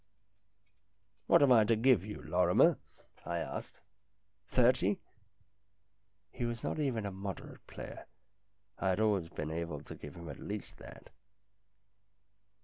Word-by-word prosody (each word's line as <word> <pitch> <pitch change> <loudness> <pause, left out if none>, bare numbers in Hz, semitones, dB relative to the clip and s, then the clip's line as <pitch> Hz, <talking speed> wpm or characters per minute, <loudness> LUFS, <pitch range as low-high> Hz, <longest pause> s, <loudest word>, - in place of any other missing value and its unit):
" 100 +1 -45
What - - +6
am 140 - +5
I 115 -3 +7
to 115 +2 +3
give 120 -3 +4
you, 105 +1 -7
Lorrimer? 90 +3 +4 0.2
" - - -37
I 85 0 -1
asked. 85 - -5 0.4
" 100 -1 -47
Thirty? 120 -6 +4 0.7
" 100 0 -46
He - - -5
was 120 -1 -3
not - - -2
even 125 -8 0
a 100 - -3
moderate 95 0 -7
player. - - -9 0.7
I 95 - +1
had 95 - +1
always 100 -6 +2
been 75 -1 -5
able 80 -3 -4
to - - -9
give 75 -1 -10
him 85 -1 -9
at 70 - -8
least - - -6
that. - - -13
100 Hz, 150 wpm, -33 LUFS, 90-110 Hz, 0.7 s, I